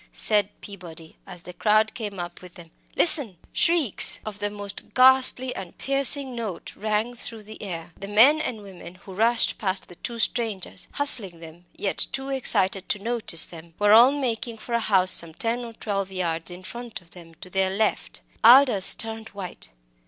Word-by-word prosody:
said 205 -2 +1
Peabody, 170 -5 -11
as 175 - -9
the 180 - -11
crowd 215 +4 +1
came 205 -5 -7
up 175 0 -8
with 180 -1 -14
them. 165 -2 -14 0.2
"Listen!" 275 - +3 0.2
Shrieks 330 - +3
of 210 -1 -8
the 205 0 -2
most 205 -1 -8
ghastly 260 0 +4
and 185 -3 -9
piercing 275 -1 +3
note, 220 -7 -7
rang 215 +3 -2
through 230 -2 -6
the 215 +1 -12
air. 175 -4 -7
The 195 - -8
men 250 +10 +4
and 220 -8 -5
women 180 -3 -13
who 190 +1 -14
rushed 225 +4 0
past 190 -2 -3
the 175 - -13
two 235 - -7
strangers 220 -5 -2
hustling 215 -12 +4
them, 165 +2 -14
yet 200 - -1
too 270 +1 -5
excited 200 -8 0
to - - 0
notice 215 -6 +1
them 165 -1 -14
were 205 0 +3
all 240 +5 +7
making 240 -4 -4
for 235 - -9
a 235 - +1
house 190 -4 +2
some 165 -2 0
ten 235 +4 -3
or 230 -1 -9
twelve 195 -3 -4
yards 170 -3 -3
in 180 +1 -11
front 235 +2 -9
of 170 - -23
them, 165 -2 -15
to 180 +3 -14
their 190 0 0
left. 210 +3 -2 0.2
Aldous 240 -4 +7
had - - -13
turned 225 0 -4
white. 185 -3 -9
210 Hz, 185 wpm, -23 LUFS, 185-235 Hz, 0.2 s, all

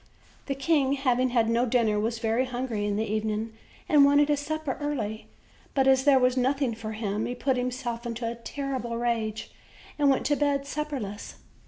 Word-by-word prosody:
The 275 - -1
king 275 -1 +2
having 255 -2 +1
had 235 -2 +2
no 235 +2 +2
dinner, 225 -3 +2
was 225 +2 -1
very 225 +2 +1
hungry 240 -4 -3
in 205 - 0
the 220 +2 0
evening 215 +1 -2 0.3
and 295 -2 +6
wanted 285 +1 +5
his 295 -1 +2
supper 305 -2 -3
early; 225 -8 -3 0.5
but 270 -1 +3
as 265 0 +4
there 265 -3 +5
as 250 0 +2
nothing 265 0 +1
for 220 -1 -6
him, 215 -1 -2
he 245 - -4
put 265 +1 0
himself 250 -1 -3
into 230 0 -3
a 230 - -2
terrible 240 0 -4
rage 225 -2 -2 0.5
and 285 -1 +4
went 270 - +2
to 290 - +2
bed 285 -1 0
supperless. 280 -9 -5
250 Hz, 185 wpm, -27 LUFS, 225-275 Hz, 0.5 s, and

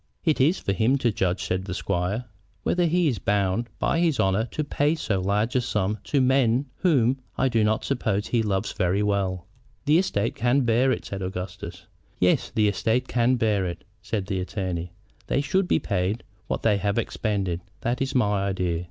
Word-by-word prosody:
"It 155 -4 +2
is 160 +8 +4
for 100 - -2
him 115 +8 +2
to 120 -4 +1
judge," 90 -2 -1
said 95 +1 -1
the 95 -2 -4
squire, 100 +6 -1 0.4
"whether 175 -1 +2
he 175 +1 +2
is 120 -9 0
bound 100 +4 0
by 165 - +1
his 165 -4 +2
honor 95 +3 +2
to 155 +5 -3
pay 145 +1 +1
so 105 -11 -1
large 105 +6 0
a 125 - +4
sum 105 -3 -1
to 145 - +1
men 130 -1 +3
whom 135 -8 +2 0.2
I 135 - +2
do 115 -3 +2
not 110 +1 +1
suppose 110 -6 0
he 120 - +1
loves 100 -3 -1
very 95 +2 +1
well." 95 -3 0 0.4
"The 150 +3 +5
estate 115 - 0
can 120 +4 +2
bear 120 +2 +3
it," - - -2
said 100 -1 -5
Augustus. 90 -1 -6 0.3
"Yes, 90 0 +2
the 110 -1 +2
estate 115 +5 0
can 125 +1 +2
bear 110 -5 +1
it," 85 -1 -6 0.2
said 105 -4 -3
the 95 -2 -2
attorney. 90 -2 -3 0.4
"They - - +1
should 190 +6 +1
be - - +3
paid 100 +2 -1 0.2
what - - -2
they 105 -3 +3
have 100 +2 -1
expended. 100 -6 -1 0.2
That 120 +2 -1
is 135 0 -1
my 105 -5 +2
idea. 90 -3 -1
110 Hz, 195 wpm, -25 LUFS, 95-130 Hz, 0.4 s, The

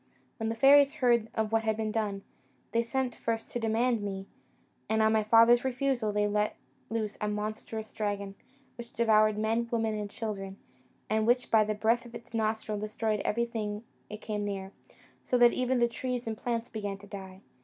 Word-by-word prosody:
When 225 0 -2
the 225 - -2
fairies 280 +4 +6
heard 240 -5 +2
of 220 -1 0
what 225 0 +3
had 220 -1 0
been 220 -1 -1
done, 205 -3 -2 0.5
they 230 - +2
sent 250 +1 -1
first 225 -1 -3
to 240 - -2
demand 230 +1 +1
me; 195 -1 -4 0.6
and 220 - +2
on 220 0 +4
my 220 -1 +3
father's 230 +2 +6
refusal, 255 -3 0
they 210 0 +1
let 210 +1 0 0.3
loose 220 -2 -3
a 210 - 0
monstrous 215 +1 -4
dragon, 200 -2 -3 0.5
which 235 0 -9
devoured 215 -2 +4
men, 225 +2 0
women, 225 -2 0
and 210 -1 -4
children, 200 -3 -5 0.5
and 220 +1 +1
which, 245 +1 +2
by 220 -1 +6
the 215 0 -2
breath 230 +3 +1
of 235 - -12
its 235 0 -11
nostrils, 215 -1 -1
destroyed 215 0 -1
everything 220 -2 -2 0.3
it 210 +1 -8
came 210 -1 -3
near, 195 -1 -4 0.5
so 250 - +1
that 240 -1 +6
even 255 0 +1
the 240 -1 +4
trees 245 +1 -4
and 225 -1 -3
plants 235 +1 -2
began 205 -3 -4
to 200 - -14
die. 190 -2 -9
220 Hz, 185 wpm, -30 LUFS, 210-235 Hz, 0.6 s, fairies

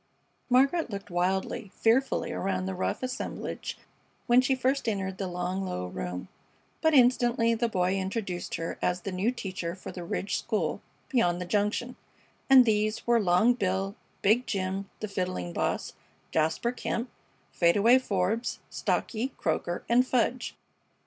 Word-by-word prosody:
Margaret 275 +5 +3
looked 200 -3 -7
wildly, 190 +3 -1
fearfully, 255 +4 +2
around 95 0 -1
the 95 - -2
rough 95 - -2
assemblage 255 0 -4 0.5
when 240 +1 +6
she 265 +1 +2
first 260 -1 +1
entered 190 -2 -3
the 195 - -2
long, 180 +2 -2
low 90 - -3
room, 90 0 -5 0.5
but 320 -1 +4
instantly 240 -2 +4
the 230 +1 0
boy 185 -2 +1
introduced 190 -1 -3
her 165 - -4
as 180 0 0
"the 195 - -4
new 185 +5 +1
teacher 185 -7 -4
for 185 - -8
the 175 - -7
Ridge 190 +3 -2
School 220 -3 -1 0.3
beyond 180 - +2
the 180 - -3
Junction," 210 +6 -1 0.5
and 260 -2 +9
these 215 -1 +1
were 235 -1 +4
Long 200 +4 +4
Bill, 195 -3 -1 0.3
Big 225 +5 +3
Jim, 195 0 -2
the 215 - -2
Fiddling 180 - -3
Boss, - - -1 0.4
Jasper 160 +9 +1
Kemp, 240 0 -3 0.4
Fade 170 +2 +3
away 235 +5 +6
Forbes, 215 +1 -1
Stocky, 250 +4 -1
Croaker, 175 - -1
and 250 +2 +4
Fudge. 250 0 0
200 Hz, 150 wpm, -28 LUFS, 180-240 Hz, 0.5 s, and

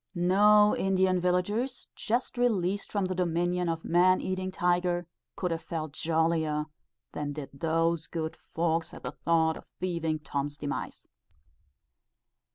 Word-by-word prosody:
No 210 +4 +5
Indian 190 -1 +2
villagers, 205 +9 0
just 240 +4 -1
released 205 -5 0
from 200 -2 0
the 185 - -1
dominion 175 0 0
of 165 -1 -3
a - - -5
man 180 +2 +4
eating 185 0 -2
tiger, 175 -1 +1 0.3
could 180 -2 -2
have 165 0 -2
felt 155 -3 -4
jollier 160 -1 0 0.5
than 145 -1 -4
did 145 -2 -7
those 165 +2 0
good 160 -1 -3
folks 165 0 -2
at - - -11
the - - -3
thoughts 160 -1 +1
of - - -17
thieving 170 -3 -1
Tom's 145 -1 -4
demise. 145 -1 -5
175 Hz, 140 wpm, -29 LUFS, 160-185 Hz, 0.5 s, No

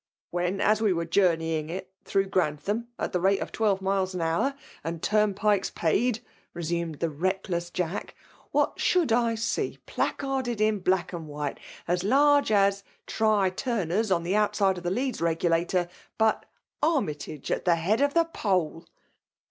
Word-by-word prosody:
" - - -70
When, 175 +2 -1
as 215 +1 +3
we 210 -4 +3
were 170 -1 -2
journeying 165 -3 +1
it 185 +2 -6
through 195 0 +1
Grantham 190 +6 -1
at - - -3
the 180 - +1
rate 195 +2 +3
of - - -5
twelve 200 -3 +1
miles 190 -1 0
an 180 - -2
hour> 165 +12 +1 0.3
and 165 +1 -4
turnpikes 210 0 +2
paid/' 225 +8 +1 0.3
resumed 170 -1 -2
the 165 +3 -1
reckless 175 +2 -2
V 180 - -1
I - - -3
Jack, 200 - -6 0.2
" - - -29
what - - +1
should 350 -9 +2
I 230 0 +2
see 225 +1 -2
placarded 260 -4 -2
in 215 -1 +2
black 185 -1 0
and 165 -2 -6
white, 145 -1 -4 0.3
as 175 +1 0
large 285 +4 +4
as 200 -1 +3
* - - -40
Try 215 -4 +2
Turner's,* 215 -2 -1
on 170 -2 +2
the 180 +4 0
outside 205 -3 +2
of - - -14
the 175 - 0
Leeds 250 +5 -2
Regulator, 170 +2 +1 0.3
but 220 -1 +2 0.2
' - - -56
Army 290 - +2
tage 145 -1 -8
at - - -1
the 175 -2 +5
head 195 +9 +1
of 285 +1 +2
the 335 0 +5
poll 185 - -1
190 Hz, 180 wpm, -27 LUFS, 170-215 Hz, 0.3 s, the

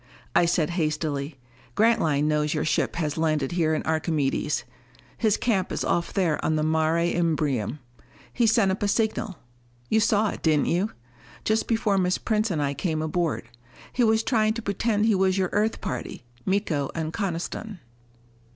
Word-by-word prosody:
I 175 - +5
said 170 -1 +1
hastily, 155 -3 -2 0.4
"Grantline 185 -10 +3
knows 150 0 +1
your 150 - 0
ship 155 - 0
has 155 -2 -2
landed 155 -4 +1
here 160 -3 +1
on - - -2
Archimedes. 155 -2 0 0.5
His 215 -3 +2
camp 195 -6 0
is - - -2
off 170 - 0
there 175 -6 0
on 155 - +1
the 155 - +1
Mare 160 +1 +2
Imbrium. 150 - 0 0.6
He 235 -2 +2
sent 220 -3 +4
up 190 - -3
a 205 - +1
signal 215 -2 0 0.5
you 220 - +3
saw 215 0 +3
it, - - -6
didn't 155 -3 +3
you? 185 +6 +1 0.5
just 220 +1 +1
before 220 -4 +1
Miss 180 0 +1
Prince 215 0 0
and 155 -5 0
I 140 0 0
came 155 0 -2
aboard. 160 -6 -1 0.5
He 250 - +2
was 220 0 +3
trying 220 -3 +2
to 230 - -5
pretend 210 +1 0
he 225 - +4
was 190 0 +2
your 185 -2 +1
Earth 215 +2 0
party, 125 0 -5 0.2
Miko 180 -8 0
and 160 -1 -3
Coniston." 195 +2 -3
175 Hz, 170 wpm, -25 LUFS, 155-210 Hz, 0.6 s, I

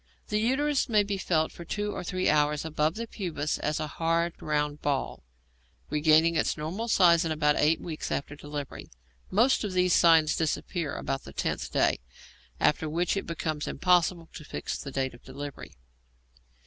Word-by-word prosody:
The 210 -1 +1
uterus 270 +5 +1
may 210 -2 +4
be 200 -1 -3
felt 160 -4 +1
for 170 - -10
two 205 +4 -3
or - - -5
three 185 +1 -1
hours 150 0 +2
above 155 0 0
the 230 +1 -4
pubis 170 -9 -3
as 150 0 -1
a 155 - -1
hard 165 +2 0
round 150 -1 -1
ball, 140 -2 -1 0.7
regaining 155 +2 +4
its 160 - +1
normal 175 +10 -4
size 175 -5 +5
in 165 - -2
about 150 -1 +2
eight 155 +2 +3
weeks 160 -3 -5
after 140 +1 -3
delivery. 145 -1 -7 0.4
Most 235 +8 +3
of 205 -3 -3
these 180 -1 +3
signs 160 -3 +5
disappear 160 0 -2
about 135 - -3
the 70 - -11
tenth - - -2
day, - - +2 0.6
after 155 +1 +2
which 170 +4 0
it 195 - -3
becomes 155 -2 -3
impossible 175 0 +2
to 160 - -9
fix - - -5
the 140 - -6
date 130 -1 -2
of 120 - -15
delivery. 140 - -8
160 Hz, 175 wpm, -28 LUFS, 150-180 Hz, 0.7 s, size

